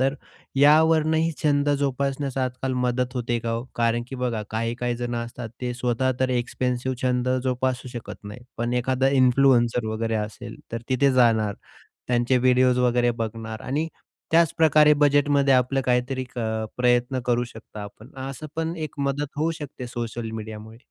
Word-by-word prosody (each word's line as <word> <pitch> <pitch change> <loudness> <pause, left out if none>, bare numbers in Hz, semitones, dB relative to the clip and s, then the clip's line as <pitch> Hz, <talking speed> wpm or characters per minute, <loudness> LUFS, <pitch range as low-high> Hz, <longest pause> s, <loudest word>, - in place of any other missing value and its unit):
तर 135 +1 +2 0.4
यावरूनही 160 +2 +4
छंद 145 -1 +2
जोपासण्यास 140 0 -1
आजकाल 130 0 -2
मदत 125 +1 -1
होते 120 -1 -1
का 115 0 -3
हो? 115 +1 -2
कारण 120 0 +1
की 135 - -6
बघा 120 -4 -2
काही-काही 120 +2 -2
जणं 120 -1 -3
असतात 120 0 -7
ते 125 -1 -2
स्वतः 125 +1 0
तर 130 - +2
एक्सपेन्सिव्ह 125 +1 -1
छंद 125 0 +1 0.2
जोपासू 130 0 -1
शकत 120 -3 -8
नाही. 105 +4 -8 0.2
पण 120 +1 -2
एखादा 130 +2 +1
इन्फ्लुएन्सर 125 -2 +4
वगैरे 110 +1 -2
असेल 110 +2 -5 0.2
तर 115 0 -4
तिथे 135 +1 +3
जाणार. 115 -5 +3 0.5
त्यांचे 120 +1 +2
व्हिडिओस 125 0 +4
वगैरे 120 -1 +3
बघणार 110 0 -4
आणि 150 +6 -1 0.4
त्याचप्रकारे 155 -2 +5
बजेटमध्ये 145 -1 +3
आपलं 130 +2 +2
काहीतरी 125 +1 0
क - - -6 0.4
प्रयत्न 125 +1 +2
करू 120 0 +2
शकता 110 -2 -10
आपण, 105 +4 -11
असं 135 +3 -6
पण 165 +1 -1
एक 155 -2 -6
मदत 140 +1 -1
होऊ 155 +3 +1
शकते 140 -3 -7
सोशल 120 -2 -5
मीडियामुळे. 110 0 -8
125 Hz, 150 wpm, -24 LUFS, 120-135 Hz, 0.5 s, त्याचप्रकारे